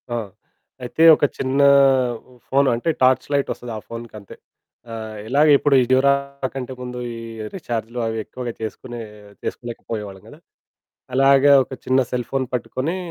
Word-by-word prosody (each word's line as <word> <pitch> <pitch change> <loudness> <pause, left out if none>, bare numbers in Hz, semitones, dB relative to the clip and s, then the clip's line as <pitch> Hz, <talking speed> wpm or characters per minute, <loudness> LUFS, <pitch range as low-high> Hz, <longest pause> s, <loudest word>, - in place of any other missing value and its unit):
ఆ! 120 - -2 0.7
అయితే, 125 +6 0
ఒక - - -7
చిన్నా 135 +2 +2 0.6
ఉ - - -18
ఫోను 135 0 +3
అంటే, 120 +8 -2
టార్చ్ 130 0 +4
లైటొస్తది 135 -3 -2
ఆ - - -5
ఫోనుకంతే. 115 -4 -9 0.6
ఆహ్, 110 -1 -7
ఇలాగిప్పుడు 145 +2 +4
ఈ - - +3
డ్యురా 135 +2 +5 0.4
కంటే 130 -1 -5
ముందు, 125 0 -6 0.2
ఈ - - -8 0.4
రీచార్జులు 120 -8 -4
అవెక్కువగా 115 +2 -5
చేసుకునే 120 +2 -6 0.4
చేసుకోలేకపోయేవాళ్ళం 105 -5 -6
గదా! - - -14 0.8
అలాగా 135 +1 +5
ఒక - - -17
చిన్న 130 +1 +3
సెల్‌ 125 -2 -2
ఫోన్ 135 -1 0
పట్టుకొనీ, 130 +6 -2
125 Hz, 135 wpm, -21 LUFS, 115-135 Hz, 0.8 s, డ్యురా